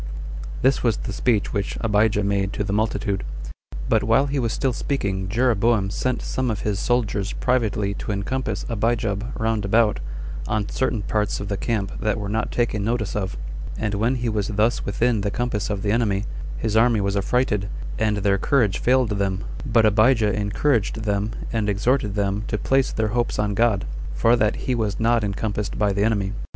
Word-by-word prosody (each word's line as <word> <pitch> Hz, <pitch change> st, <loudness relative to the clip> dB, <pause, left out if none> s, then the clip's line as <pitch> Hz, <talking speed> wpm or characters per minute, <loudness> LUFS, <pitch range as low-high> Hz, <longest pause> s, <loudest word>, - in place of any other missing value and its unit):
3. -, -, -8 dB, 0.6 s
This 130 Hz, +1 st, +3 dB
was 115 Hz, -3 st, +2 dB
the 110 Hz, -, -5 dB
speech 110 Hz, -1 st, +1 dB
which 100 Hz, -2 st, -2 dB
Abijah 105 Hz, -1 st, +2 dB
made 100 Hz, -1 st, 0 dB
to -, -, -1 dB
the 100 Hz, -1 st, -2 dB
multitude. 105 Hz, -2 st, 0 dB, 0.6 s
But -, -, +3 dB
while 115 Hz, +6 st, +3 dB
he 140 Hz, 0 st, -1 dB
was 115 Hz, -3 st, 0 dB
still 130 Hz, +2 st, 0 dB
speaking 95 Hz, -9 st, -2 dB
Jeroboam 115 Hz, -3 st, +2 dB
sent 130 Hz, +3 st, -1 dB
some 130 Hz, -1 st, -1 dB
of 110 Hz, -, -2 dB
his 105 Hz, -2 st, -1 dB
soldiers 110 Hz, -5 st, 0 dB
privately 110 Hz, -5 st, 0 dB
to 105 Hz, -, -4 dB
encompass 130 Hz, +7 st, -2 dB
Abijab 115 Hz, -1 st, -1 dB
round 110 Hz, -2 st, 0 dB
about, 105 Hz, +1 st, +3 dB, 0.5 s
on 105 Hz, -2 st, 0 dB
certain 115 Hz, -5 st, -1 dB
parts 105 Hz, 0 st, 0 dB
of 100 Hz, -, -5 dB
the 100 Hz, -, 0 dB
camp 100 Hz, -1 st, -2 dB
that 105 Hz, -1 st, +1 dB
were 100 Hz, -2 st, -4 dB
not 110 Hz, +1 st, -1 dB
taken 115 Hz, -4 st, 0 dB
notice 110 Hz, -2 st, -1 dB
of; 95 Hz, -2 st, -2 dB, 0.4 s
and 105 Hz, -2 st, -1 dB
when 115 Hz, +6 st, +1 dB
he 120 Hz, -1 st, -2 dB
was 105 Hz, -3 st, 0 dB
thus 110 Hz, +3 st, +1 dB
within 115 Hz, +2 st, +1 dB
the 100 Hz, -, 0 dB
compass 110 Hz, -2 st, -2 dB
of 100 Hz, -2 st, -2 dB
the 105 Hz, -, +1 dB
enemy, 105 Hz, -3 st, +1 dB, 0.3 s
his 110 Hz, -1 st, -1 dB
army 115 Hz, 0 st, +4 dB
was 100 Hz, 0 st, 0 dB
affrighted, 105 Hz, -1 st, +1 dB, 0.3 s
and 110 Hz, -1 st, +1 dB
their 100 Hz, -1 st, +2 dB
courage 115 Hz, -9 st, +2 dB
failed 125 Hz, -1 st, +3 dB
them; 100 Hz, -1 st, -1 dB, 0.2 s
but 115 Hz, -2 st, +4 dB
Abijah 110 Hz, 0 st, +4 dB
encouraged 110 Hz, +1 st, 0 dB
them, 105 Hz, 0 st, 0 dB, 0.2 s
and 110 Hz, -2 st, 0 dB
exhorted 105 Hz, +1 st, +1 dB
them 100 Hz, 0 st, 0 dB
to 105 Hz, -, -1 dB
place 135 Hz, +4 st, +2 dB
their 110 Hz, -1 st, 0 dB
hopes 120 Hz, +2 st, 0 dB
on 105 Hz, -1 st, 0 dB
God, 105 Hz, -2 st, +2 dB, 0.3 s
for 115 Hz, +1 st, +4 dB
that 110 Hz, -2 st, +2 dB
he 130 Hz, -, +1 dB
was 110 Hz, -4 st, -1 dB
not 115 Hz, 0 st, +3 dB
encompassed 105 Hz, 0 st, -2 dB
by 105 Hz, -2 st, +2 dB
the 100 Hz, +1 st, +1 dB
enemy. 100 Hz, -3 st, +1 dB
105 Hz, 190 wpm, -23 LUFS, 100-120 Hz, 0.6 s, army